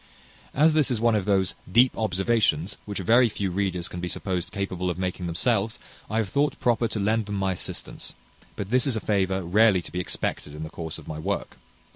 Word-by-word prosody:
As 155 Hz, +3 st, +5 dB
this 155 Hz, -3 st, +3 dB
is 120 Hz, -4 st, 0 dB
one 115 Hz, 0 st, +3 dB
of 105 Hz, -3 st, +1 dB
those 95 Hz, -2 st, +2 dB, 0.2 s
deep 120 Hz, +6 st, +5 dB
observations 95 Hz, -4 st, +1 dB
which 105 Hz, -1 st, -5 dB
very 115 Hz, +6 st, +4 dB
few 100 Hz, -3 st, -2 dB
readers 90 Hz, -2 st, -1 dB
can 90 Hz, -, -7 dB
be 90 Hz, -, -3 dB
supposed 90 Hz, -1 st, -3 dB
capable 95 Hz, -2 st, -2 dB
of 90 Hz, -, -3 dB
making 90 Hz, -1 st, -3 dB
themselves, 105 Hz, +5 st, 0 dB, 0.3 s
I 110 Hz, -, -1 dB
have 110 Hz, -4 st, 0 dB
thought 145 Hz, +7 st, +1 dB
proper 120 Hz, -1 st, +2 dB
to 110 Hz, -, -4 dB
lend 110 Hz, +1 st, +1 dB
them 105 Hz, -, -3 dB
my 95 Hz, -1 st, 0 dB
assistance; 90 Hz, -, -6 dB, 0.4 s
but 100 Hz, +1 st, -5 dB
this 130 Hz, +2 st, +4 dB
is 130 Hz, -, +1 dB
a -, -, 0 dB
favour 95 Hz, -3 st, 0 dB
rarely 95 Hz, +1 st, +4 dB
to -, -, -10 dB
be 90 Hz, -, -3 dB
expected 75 Hz, -4 st, -3 dB
in 75 Hz, -, -6 dB
the 80 Hz, -, -7 dB
course 80 Hz, -1 st, -6 dB
of -, -, -12 dB
my 75 Hz, 0 st, -5 dB
work. 100 Hz, +5 st, -3 dB
100 Hz, 215 wpm, -26 LUFS, 90-115 Hz, 0.4 s, As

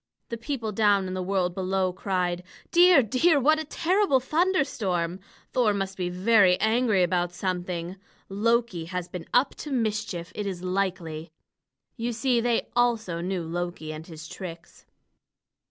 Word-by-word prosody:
The 230 Hz, -, -4 dB
people 235 Hz, -2 st, -3 dB
down 205 Hz, -2 st, +3 dB
in 185 Hz, -, -4 dB
the 185 Hz, -, -2 dB
world 180 Hz, -1 st, 0 dB
below 185 Hz, 0 st, 0 dB
cried: 180 Hz, -2 st, -1 dB, 0.3 s
"Dear, 350 Hz, -5 st, +7 dB
dear! 285 Hz, -, +3 dB
What 305 Hz, +4 st, +3 dB
a -, -, -2 dB
terrible 345 Hz, -1 st, +2 dB
thunderstorm! 245 Hz, -, 0 dB, 0.3 s
Thor 225 Hz, -5 st, +3 dB
must 195 Hz, -1 st, -3 dB
be 180 Hz, -2 st, -2 dB
very 185 Hz, 0 st, +4 dB
angry 220 Hz, -3 st, +2 dB
about 175 Hz, 0 st, 0 dB
something. 180 Hz, -1 st, -3 dB, 0.3 s
Loki 220 Hz, -3 st, 0 dB
has 180 Hz, 0 st, -4 dB
been 180 Hz, -2 st, -8 dB
up 255 Hz, +3 st, +3 dB
to 295 Hz, -, -7 dB
mischief, 210 Hz, -8 st, -2 dB
it 210 Hz, -1 st, -4 dB
is 185 Hz, -2 st, -5 dB
likely." 180 Hz, -4 st, -2 dB, 0.7 s
You 235 Hz, +1 st, -2 dB
see, 240 Hz, +1 st, +1 dB
they 240 Hz, -1 st, 0 dB
also 225 Hz, -8 st, +1 dB
knew 180 Hz, 0 st, -2 dB
Loki 170 Hz, -1 st, -4 dB
and 155 Hz, +1 st, -9 dB
his 160 Hz, -2 st, -9 dB
tricks. 170 Hz, -1 st, -10 dB
195 Hz, 150 wpm, -26 LUFS, 180-235 Hz, 0.7 s, Dear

